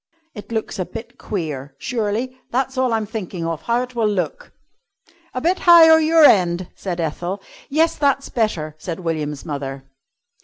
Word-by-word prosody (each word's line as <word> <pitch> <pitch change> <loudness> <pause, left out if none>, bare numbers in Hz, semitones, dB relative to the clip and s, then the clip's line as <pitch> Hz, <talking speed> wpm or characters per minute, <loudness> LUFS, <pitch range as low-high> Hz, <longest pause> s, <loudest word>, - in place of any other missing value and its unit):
It 210 0 -10
looks 220 -3 -3
a 185 - 0
bit 225 +5 -9
queer, 145 -8 -4
surely. 235 - -2
That's 265 +2 -1
all 255 -1 +1
I'm 220 -1 0
thinking 190 -5 -5
of 165 -1 -3
how 235 +1 0
it 250 0 -9
will 225 -3 +1
look." 210 - -3 0.8
"A - - 0
bit 355 +5 +1
higher 325 -2 +8
your 320 0 +4
end," 180 -6 +4
said 180 -3 -4
Ethel. 175 +4 -3 0.3
"Yes, 320 +3 +2
that's 280 -2 +1
better," 175 -10 -1
said 175 0 -5
William's 150 -4 -3
mother. 140 -3 -5
210 Hz, 160 wpm, -21 LUFS, 170-255 Hz, 0.8 s, higher